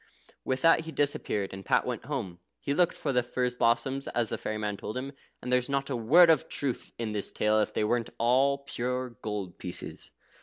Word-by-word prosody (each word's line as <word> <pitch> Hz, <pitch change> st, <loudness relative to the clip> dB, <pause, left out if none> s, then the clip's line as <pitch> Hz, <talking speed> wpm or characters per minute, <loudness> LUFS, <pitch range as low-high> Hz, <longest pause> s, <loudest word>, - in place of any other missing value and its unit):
With 130 Hz, 0 st, -1 dB
which 165 Hz, -1 st, +5 dB
he 160 Hz, -, -6 dB
disappeared, 135 Hz, -10 st, -1 dB
and 95 Hz, 0 st, -7 dB
Pat -, -, +2 dB
went 125 Hz, -2 st, -4 dB
home. 110 Hz, -12 st, -4 dB, 0.2 s
He 140 Hz, -, -1 dB
looked 175 Hz, +3 st, +2 dB
for -, -, -1 dB
the 125 Hz, -, +4 dB
furze 125 Hz, 0 st, -1 dB
blossoms, 130 Hz, +3 st, +1 dB
as 120 Hz, -2 st, -1 dB
the -, -, -2 dB
fairy 110 Hz, -, -3 dB
man 105 Hz, -1 st, -2 dB
told 105 Hz, +3 st, -6 dB
him, 135 Hz, +2 st, -4 dB, 0.3 s
and 125 Hz, -, -3 dB
there's 125 Hz, +1 st, +2 dB
not 140 Hz, 0 st, -1 dB
a -, -, 0 dB
word 160 Hz, +10 st, +6 dB
of 155 Hz, -5 st, +1 dB
truth 135 Hz, -4 st, -3 dB
in 115 Hz, -2 st, -3 dB
this 105 Hz, -2 st, -3 dB
tale 105 Hz, 0 st, +2 dB
if 105 Hz, -, +1 dB
they -, -, 0 dB
weren't 115 Hz, +2 st, 0 dB
all 130 Hz, +4 st, +3 dB
pure 125 Hz, -2 st, -3 dB
gold 105 Hz, -5 st, -5 dB
pieces. 90 Hz, -, -5 dB
125 Hz, 215 wpm, -29 LUFS, 110-140 Hz, 0.3 s, word